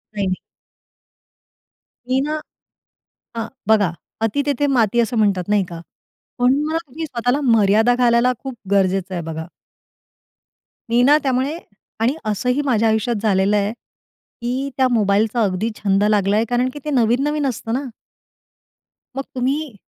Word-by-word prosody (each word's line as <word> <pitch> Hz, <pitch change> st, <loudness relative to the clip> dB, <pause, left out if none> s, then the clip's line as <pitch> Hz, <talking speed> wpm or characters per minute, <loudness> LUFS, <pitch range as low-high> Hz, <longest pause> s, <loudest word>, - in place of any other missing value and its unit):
नाही, 200 Hz, -2 st, -1 dB
नाही. 185 Hz, -, -2 dB, 1.7 s
मी 260 Hz, +1 st, +2 dB
ना 305 Hz, +2 st, -2 dB, 1.0 s
हां, 225 Hz, -, -2 dB, 0.2 s
बघा, 205 Hz, -5 st, +3 dB, 0.3 s
"अति 225 Hz, +6 st, +1 dB
तेथे 285 Hz, 0 st, +1 dB
माती" 240 Hz, -4 st, +2 dB
असं 235 Hz, +1 st, +1 dB
म्हणतात, 200 Hz, -4 st, +2 dB
नाही 210 Hz, -1 st, +3 dB
का? 170 Hz, -1 st, -8 dB, 0.6 s
म्हणून 260 Hz, +4 st, +3 dB
मग 325 Hz, -, +2 dB, 0.2 s
ही 325 Hz, -, -2 dB
स्वतःला 245 Hz, +1 st, -1 dB
मर्यादा 225 Hz, 0 st, +4 dB
घालायला 245 Hz, 0 st, +3 dB
खूप 265 Hz, -2 st, -7 dB, 0.2 s
गरजेचं 190 Hz, -1 st, +1 dB
आहे 175 Hz, -, -2 dB
बघा. 160 Hz, 0 st, -6 dB, 1.4 s
मी 235 Hz, +1 st, +3 dB
ना 290 Hz, +3 st, +6 dB
त्यामुळे 265 Hz, +3 st, 0 dB, 0.4 s
आणि 245 Hz, +6 st, +1 dB
असंही 250 Hz, +6 st, 0 dB
माझ्या 225 Hz, -4 st, +2 dB
आयुष्यात 220 Hz, +2 st, 0 dB
झालेलं 200 Hz, -1 st, +2 dB
आहे 205 Hz, +1 st, 0 dB, 0.7 s
की 255 Hz, +3 st, -2 dB
त्या 260 Hz, -1 st, +4 dB
मोबाईलचा 220 Hz, +1 st, +2 dB
अगदी 195 Hz, +3 st, 0 dB
छंद 195 Hz, 0 st, +1 dB
लागला 205 Hz, -1 st, +2 dB
आहे, 220 Hz, +2 st, +2 dB
कारण 245 Hz, +1 st, +1 dB
की 295 Hz, -, -7 dB
ते 300 Hz, -, -2 dB
नवीन-नवीन 275 Hz, +4 st, +1 dB
असतं 230 Hz, -3 st, -3 dB
ना! 270 Hz, +4 st, -1 dB, 1.3 s
मग 270 Hz, -, -1 dB
तुम्ही 270 Hz, +2 st, -1 dB
235 Hz, 140 wpm, -20 LUFS, 205-260 Hz, 1.7 s, ना